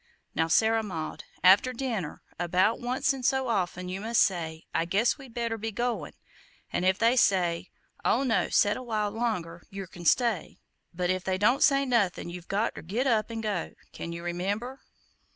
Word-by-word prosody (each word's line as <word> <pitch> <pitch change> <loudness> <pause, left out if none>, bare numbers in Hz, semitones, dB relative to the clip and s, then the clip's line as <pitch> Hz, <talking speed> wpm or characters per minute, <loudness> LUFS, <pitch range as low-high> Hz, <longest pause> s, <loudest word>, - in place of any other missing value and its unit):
Now, 160 - +1
Sarah 225 +6 +3
Maud, 165 -7 -5 0.2
after 195 +7 +6
dinner, 230 - -4 0.2
about 185 +5 +2
once 255 +4 0
in 270 - -6
so 265 0 +1
often, 180 -4 -1
you 185 +2 -4
must 230 +2 +3
say, 160 -4 -2
'I 165 - +1
guess 205 +11 +1
we'd 260 -4 -13
better 230 -2 -2
be 225 +1 -3
goin';' 240 +3 -2 0.6
an' - - 0
if 185 +1 +3
they 230 +2 +3
say, 180 -7 +2 0.3
'Oh, 255 - +2
no, 240 -4 +1
set 205 0 +3
a - - -6
while 215 -4 -1
longer,' 185 -7 -2
yer 195 0 -6
can 175 -1 -11
stay; 230 -2 +2 0.3
but 180 +1 -1
if 185 0 -2
they 190 -1 0
don't 240 +7 +3
say 275 -1 +4
nothin' 205 -9 +1
you've 175 0 -9
got 210 +4 0
ter - - -8
get 215 +11 -2
up 225 -4 +2
an' 225 -1 -4
go. 205 -6 -2 0.2
Can 170 - -6
you 170 0 -6
remember?" 200 +9 -3
205 Hz, 190 wpm, -28 LUFS, 180-235 Hz, 0.6 s, after